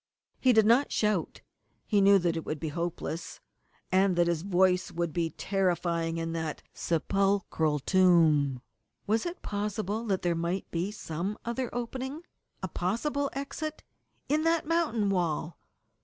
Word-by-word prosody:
He 255 Hz, -, +4 dB
did 220 Hz, -3 st, +5 dB
not 240 Hz, +6 st, +4 dB
shout. 210 Hz, -5 st, 0 dB, 0.4 s
He 205 Hz, -3 st, +2 dB
knew 200 Hz, 0 st, +7 dB
that 175 Hz, -3 st, 0 dB
it 165 Hz, -, -3 dB
would 155 Hz, -, -4 dB
be 160 Hz, -, -3 dB
hopeless, 170 Hz, +1 st, -4 dB, 0.5 s
and 190 Hz, 0 st, +3 dB
that 175 Hz, 0 st, +4 dB
his 170 Hz, -2 st, 0 dB
voice 185 Hz, 0 st, +2 dB
would 170 Hz, -2 st, -2 dB
be 170 Hz, -1 st, 0 dB
terrifying 170 Hz, -2 st, -1 dB
in 165 Hz, 0 st, -3 dB
that 160 Hz, -2 st, -4 dB
sepulchral 170 Hz, -3 st, +1 dB
tomb. 155 Hz, -6 st, +3 dB, 0.4 s
Was 220 Hz, +8 st, +1 dB
it 345 Hz, +1 st, -7 dB
possible 210 Hz, +1 st, -2 dB
that 195 Hz, -4 st, -1 dB
there 175 Hz, -1 st, +2 dB
might 170 Hz, +3 st, -2 dB
be 175 Hz, +3 st, -1 dB
some 195 Hz, -1 st, -4 dB
other 240 Hz, +2 st, -2 dB
opening 260 Hz, +6 st, -4 dB, 0.4 s
a -, -, 0 dB
possible 275 Hz, -, -1 dB
exit 295 Hz, +3 st, -5 dB, 0.4 s
in 300 Hz, +2 st, +2 dB
that 330 Hz, 0 st, +2 dB
mountain 270 Hz, -12 st, +1 dB
wall? 170 Hz, -3 st, -1 dB
190 Hz, 145 wpm, -29 LUFS, 170-225 Hz, 0.5 s, knew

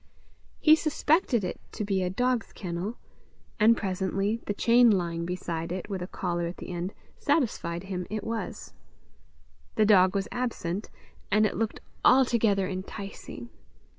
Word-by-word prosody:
He 310 Hz, 0 st, +7 dB
suspected 310 Hz, -, +1 dB
it 180 Hz, -, -4 dB
to 210 Hz, -, -3 dB
be 195 Hz, -2 st, 0 dB
a 180 Hz, -, 0 dB
dog's 245 Hz, +4 st, 0 dB
kennel; 185 Hz, +5 st, -4 dB, 0.6 s
and 225 Hz, +2 st, +6 dB
presently 195 Hz, +3 st, -1 dB
the 205 Hz, -, 0 dB
chain 235 Hz, +2 st, +5 dB
lying 170 Hz, -4 st, 0 dB
beside 170 Hz, -2 st, -3 dB
it, 185 Hz, +3 st, -5 dB
with 190 Hz, -2 st, -3 dB
a 180 Hz, -, -4 dB
collar 175 Hz, -3 st, -2 dB
at 170 Hz, -, -7 dB
the -, -, -8 dB
end, 175 Hz, +3 st, -4 dB, 0.2 s
satisfied 215 Hz, -, 0 dB
him 185 Hz, -2 st, -4 dB
it 215 Hz, +1 st, -3 dB
was. 225 Hz, 0 st, -5 dB, 1.0 s
The 215 Hz, -, +4 dB
dog 190 Hz, -2 st, +5 dB
was 195 Hz, +1 st, 0 dB
absent, 220 Hz, -6 st, -3 dB, 0.4 s
and 215 Hz, +1 st, +4 dB
it -, -, -1 dB
looked 225 Hz, -1 st, -2 dB, 0.2 s
altogether 230 Hz, -7 st, +4 dB
enticing! 195 Hz, +5 st, -7 dB
200 Hz, 145 wpm, -28 LUFS, 180-230 Hz, 1.0 s, He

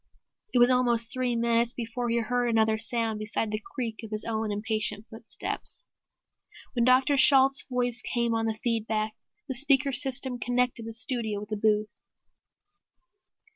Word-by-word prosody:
It -, -, 0 dB
was 245 Hz, +1 st, +5 dB
almost 240 Hz, -2 st, +2 dB
three 255 Hz, -2 st, -1 dB
minutes 235 Hz, +1 st, +1 dB
before 240 Hz, +1 st, -4 dB
he 230 Hz, -, +1 dB
heard 245 Hz, +2 st, -1 dB
another 220 Hz, -1 st, +2 dB
sound 225 Hz, -1 st, -1 dB
beside 215 Hz, 0 st, -2 dB
the 215 Hz, 0 st, -3 dB
creak 235 Hz, -5 st, -3 dB
of 225 Hz, -, -9 dB
his 215 Hz, 0 st, -3 dB
own 220 Hz, -1 st, -2 dB
impatient 215 Hz, 0 st, -1 dB
footsteps. 225 Hz, 0 st, -2 dB, 0.9 s
Then 240 Hz, -3 st, +1 dB
Dr. 260 Hz, +3 st, +3 dB
Shalt's 270 Hz, 0 st, +6 dB
voice 245 Hz, -1 st, -1 dB
came 235 Hz, -2 st, -1 dB
on 225 Hz, 0 st, -1 dB
the 220 Hz, -1 st, -3 dB
feed 230 Hz, -2 st, 0 dB
back, 215 Hz, 0 st, -1 dB, 0.3 s
the 265 Hz, -, -3 dB
speaker 275 Hz, +1 st, +3 dB
system 255 Hz, -1 st, -1 dB
connecting 245 Hz, -1 st, -1 dB
the 225 Hz, -, -7 dB
studio 225 Hz, -3 st, -2 dB
with 210 Hz, -, -9 dB
the 215 Hz, -, -2 dB
booth. 210 Hz, 0 st, +1 dB
235 Hz, 160 wpm, -27 LUFS, 220-250 Hz, 0.9 s, Shalt's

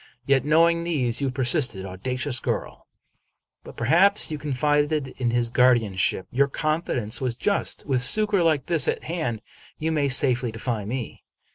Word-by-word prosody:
Yet, 135 Hz, -2 st, +2 dB
knowing 165 Hz, +3 st, +2 dB
these, 135 Hz, -8 st, -1 dB
you 140 Hz, -, 0 dB
persisted. 125 Hz, -, +1 dB
Audacious 125 Hz, +7 st, -3 dB
girl! -, -, -5 dB, 0.8 s
But -, -, -12 dB
perhaps 195 Hz, +3 st, +3 dB
you 155 Hz, -, -4 dB
confided 145 Hz, 0 st, -1 dB
in 120 Hz, -2 st, 0 dB
his 120 Hz, 0 st, -1 dB
guardian 120 Hz, -6 st, +2 dB
ship. 95 Hz, 0 st, 0 dB
Your 140 Hz, +3 st, +2 dB
confidence 145 Hz, -7 st, -2 dB
was 125 Hz, -3 st, -2 dB
just. 200 Hz, +7 st, -1 dB
With 130 Hz, -3 st, 0 dB
succor 210 Hz, +8 st, +5 dB
like 155 Hz, -5 st, +1 dB
this 165 Hz, -3 st, +1 dB
at -, -, -2 dB
hand 150 Hz, -10 st, -4 dB, 0.3 s
you 160 Hz, +1 st, -2 dB
may 145 Hz, -3 st, 0 dB
safely 125 Hz, -2 st, +2 dB
defy 115 Hz, -1 st, -4 dB
me. 120 Hz, +2 st, -6 dB
135 Hz, 155 wpm, -23 LUFS, 120-155 Hz, 0.8 s, succor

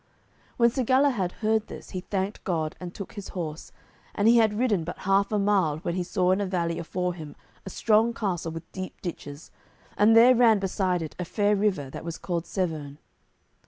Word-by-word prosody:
When 235 Hz, -1 st, +4 dB
Sir 260 Hz, +1 st, -1 dB
Galahad 255 Hz, -7 st, +2 dB
heard 220 Hz, 0 st, +2 dB
this, -, -, -10 dB
he 185 Hz, -, -3 dB
thanked 195 Hz, +2 st, -3 dB
God 160 Hz, -4 st, -2 dB
and 180 Hz, -1 st, -6 dB
took 200 Hz, +1 st, -8 dB
his 205 Hz, -3 st, -7 dB
horse, 160 Hz, -3 st, -5 dB, 0.4 s
and 205 Hz, -, +2 dB
he 235 Hz, +1 st, +6 dB
had 215 Hz, -2 st, +3 dB
ridden 215 Hz, -8 st, +1 dB
but 170 Hz, -, -6 dB
half 195 Hz, +1 st, +2 dB
a 210 Hz, -, +1 dB
mile 195 Hz, -7 st, +2 dB
when 170 Hz, +2 st, -3 dB
he 185 Hz, -, -1 dB
saw 180 Hz, 0 st, +1 dB
in 190 Hz, +2 st, +2 dB
a -, -, 0 dB
valley 170 Hz, -3 st, -1 dB
afore 180 Hz, +2 st, -2 dB
him 155 Hz, -4 st, -9 dB, 0.3 s
a -, -, -3 dB
strong 220 Hz, +3 st, +2 dB
castle 185 Hz, -7 st, -3 dB
with 165 Hz, 0 st, -9 dB
deep 185 Hz, -1 st, -7 dB
ditches, 150 Hz, -4 st, -7 dB, 0.4 s
and 215 Hz, +2 st, +5 dB
there 245 Hz, +3 st, +8 dB
ran 230 Hz, -3 st, +5 dB
beside 185 Hz, -2 st, -1 dB
it 155 Hz, -, -8 dB
a -, -, -1 dB
fair 205 Hz, +3 st, +1 dB
river, 190 Hz, -10 st, 0 dB
that -, -, -7 dB
was 165 Hz, 0 st, -5 dB
called 170 Hz, -2 st, -3 dB
Severn. 155 Hz, -7 st, -3 dB
190 Hz, 200 wpm, -26 LUFS, 170-210 Hz, 0.4 s, there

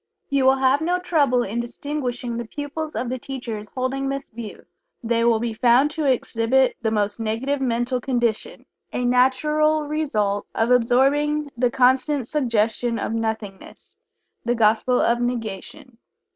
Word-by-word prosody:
You 275 Hz, -1 st, +2 dB
will 265 Hz, 0 st, +6 dB
have 265 Hz, +2 st, +2 dB
no 350 Hz, +3 st, +1 dB
trouble 290 Hz, -9 st, +2 dB
in 225 Hz, +3 st, -3 dB
distinguishing 245 Hz, -1 st, -4 dB
the 235 Hz, -1 st, -5 dB
pupils 295 Hz, +4 st, -5 dB
of 250 Hz, -, -2 dB
the 255 Hz, +1 st, -3 dB
teachers 235 Hz, -6 st, -6 dB
holding 270 Hz, +1 st, -2 dB
this 275 Hz, 0 st, -5 dB
view. 225 Hz, -2 st, -9 dB, 0.4 s
They 230 Hz, 0 st, +1 dB
will 230 Hz, -1 st, +3 dB
be 235 Hz, 0 st, -2 dB
found 245 Hz, +5 st, +3 dB
to 300 Hz, -3 st, +1 dB
exhibit 250 Hz, +1 st, +1 dB
the 225 Hz, -, +1 dB
most 210 Hz, 0 st, -1 dB
negative 235 Hz, +6 st, -2 dB
mental 245 Hz, 0 st, -1 dB
condition 240 Hz, -, -2 dB, 0.3 s
a 250 Hz, -, -2 dB
natural 300 Hz, +5 st, +2 dB
result 220 Hz, -10 st, -1 dB
of 225 Hz, +2 st, +1 dB
absorbing 280 Hz, +5 st, +2 dB
the 245 Hz, +1 st, +2 dB
constant 260 Hz, +2 st, +2 dB
suggestion 235 Hz, -4 st, 0 dB
of 220 Hz, -, -3 dB
"nothingness" 220 Hz, -3 st, -5 dB, 0.5 s
the 240 Hz, +1 st, 0 dB
gospel 230 Hz, +3 st, +3 dB
of 240 Hz, +1 st, +2 dB
negation. 240 Hz, +2 st, -5 dB
250 Hz, 145 wpm, -22 LUFS, 230-275 Hz, 0.5 s, will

